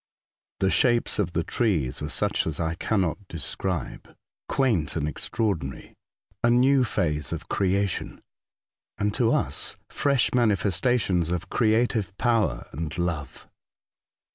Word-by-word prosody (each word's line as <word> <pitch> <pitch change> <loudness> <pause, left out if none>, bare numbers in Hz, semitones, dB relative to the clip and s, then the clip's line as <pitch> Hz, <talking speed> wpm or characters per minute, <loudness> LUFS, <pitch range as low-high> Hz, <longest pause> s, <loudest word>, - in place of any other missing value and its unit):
The 95 0 +3
shapes 120 -3 +2
of 90 -4 0
the 85 - 0
trees 80 - 0
were 75 - -3
such 75 - 0
as 80 - -2
I 80 -1 0
cannot 95 0 0
describe 80 +1 -4 0.2
— - - -76
quaint 115 - +1
and 75 -2 -1
extra 75 +9 -2
ordinary 75 -10 -3 0.3
— - - -39
a 120 - +5
new 130 +2 +5
phase 75 - -1
of 85 0 -5
creation, 100 0 0 0.8
and, 105 0 0
to 120 - +1
Tycho - - +4
Island, - - +3
107 - - -8
us, - - -5
fresh 140 -4 +2
manifestations 100 -5 +2
of 90 -1 -3
creative 110 -3 +1
power 115 -4 +1
and 80 +3 -5
love. 80 -7 -3
95 Hz, 145 wpm, -26 LUFS, 80-115 Hz, 0.8 s, a